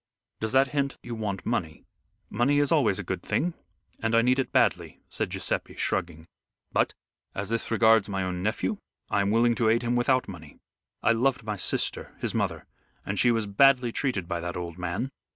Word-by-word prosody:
"Does 110 Hz, 0 st, -1 dB
that 135 Hz, 0 st, +4 dB
hint 140 Hz, -1 st, -1 dB
you 120 Hz, -, -6 dB
want 105 Hz, -4 st, -4 dB
money?" 80 Hz, -2 st, -2 dB, 0.4 s
"Money 140 Hz, +4 st, +1 dB
is 145 Hz, -1 st, +2 dB
always 130 Hz, -, +3 dB
a -, -, -4 dB
good -, -, -3 dB
thing, 175 Hz, +1 st, -1 dB, 0.5 s
and 110 Hz, 0 st, +1 dB
I 115 Hz, -, +5 dB
need 125 Hz, +2 st, +3 dB
it 135 Hz, -, -1 dB
badly," -, -, +1 dB
said -, -, -2 dB
Guiseppe -, -, -2 dB
shrugging, 80 Hz, -2 st, -2 dB, 0.5 s
"but, -, -, +1 dB, 0.4 s
as 100 Hz, +1 st, -3 dB
this 115 Hz, 0 st, -2 dB
regards 110 Hz, -2 st, +4 dB
my 95 Hz, -1 st, -1 dB
own 90 Hz, -1 st, -3 dB
nephew, 110 Hz, -, -1 dB, 0.3 s
I 100 Hz, -, +2 dB
am 100 Hz, -, +1 dB
willing 115 Hz, +2 st, +4 dB
to 115 Hz, -1 st, +2 dB
aid 115 Hz, +2 st, +2 dB
him 120 Hz, 0 st, 0 dB
without 125 Hz, +1 st, +2 dB
money. 80 Hz, -6 st, -10 dB, 0.5 s
I 115 Hz, -, +4 dB
loved 125 Hz, +2 st, +1 dB
my 105 Hz, -1 st, -3 dB
sister, 95 Hz, -, -3 dB
his -, -, -2 dB
mother, -, -, -2 dB, 0.4 s
and -, -, -2 dB
she 120 Hz, -, +4 dB
was 115 Hz, -2 st, +1 dB
badly 125 Hz, +4 st, +4 dB
treated 115 Hz, -9 st, -1 dB
by 85 Hz, -, -2 dB
that 85 Hz, +1 st, -4 dB
old 85 Hz, 0 st, -6 dB
man!" 90 Hz, +9 st, -3 dB
115 Hz, 195 wpm, -27 LUFS, 95-125 Hz, 0.5 s, I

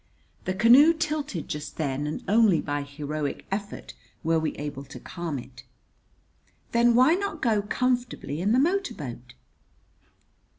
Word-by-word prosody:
The 185 Hz, -, -1 dB
canoe 250 Hz, -, +7 dB
tilted 300 Hz, -, -3 dB
just 150 Hz, 0 st, -6 dB
then, 145 Hz, -1 st, -2 dB
and 150 Hz, -, -4 dB
only 210 Hz, -5 st, +4 dB
by 145 Hz, -1 st, -2 dB
heroic 145 Hz, +1 st, -4 dB
effort, 205 Hz, +1 st, -5 dB, 0.3 s
were 165 Hz, 0 st, +2 dB
we 160 Hz, -, -2 dB
able 145 Hz, -1 st, -5 dB
to 135 Hz, -, -10 dB
calm 170 Hz, -5 st, -5 dB
it. 125 Hz, 0 st, -11 dB, 1.1 s
"Then 235 Hz, 0 st, +4 dB
why 255 Hz, +6 st, +6 dB
not 380 Hz, -3 st, -2 dB
go 220 Hz, -6 st, +2 dB
comfortably 245 Hz, -, -1 dB
in 200 Hz, +3 st, +1 dB
the 240 Hz, -, +4 dB
motor 380 Hz, +8 st, +1 dB
boat?" 125 Hz, -4 st, -8 dB
185 Hz, 140 wpm, -26 LUFS, -, 1.1 s, canoe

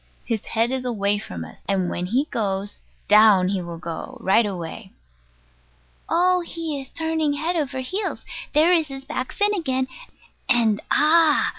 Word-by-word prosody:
His 225 Hz, -4 st, -2 dB
head 230 Hz, +2 st, 0 dB
is 260 Hz, -1 st, -2 dB, 0.4 s
from 85 Hz, -2 st, -6 dB
us; 80 Hz, -, -14 dB
and 190 Hz, -2 st, +1 dB
when 175 Hz, +1 st, -3 dB
he 255 Hz, +9 st, +1 dB
goes 200 Hz, -2 st, -2 dB, 0.3 s
down 210 Hz, -3 st, +6 dB
he 195 Hz, -2 st, -1 dB
will 170 Hz, -1 st, -7 dB
go 165 Hz, 0 st, -7 dB
right 210 Hz, +4 st, +3 dB
away. 185 Hz, 0 st, -7 dB, 1.2 s
Oh, 360 Hz, +1 st, +3 dB
he 330 Hz, -4 st, -4 dB
is 265 Hz, -, -12 dB
turning 320 Hz, -2 st, -1 dB
head 320 Hz, +5 st, -1 dB
over 275 Hz, -5 st, -2 dB
heels! 380 Hz, +10 st, -3 dB, 0.3 s
There 315 Hz, +4 st, +5 dB
is 325 Hz, -3 st, +2 dB
his 270 Hz, -1 st, -8 dB
back 260 Hz, -3 st, -4 dB
fin 415 Hz, 0 st, +1 dB
again. 260 Hz, -9 st, -1 dB, 0.6 s
And 230 Hz, -4 st, +3 dB
Ah! 310 Hz, 0 st, +4 dB
260 Hz, 155 wpm, -23 LUFS, 195-315 Hz, 1.2 s, down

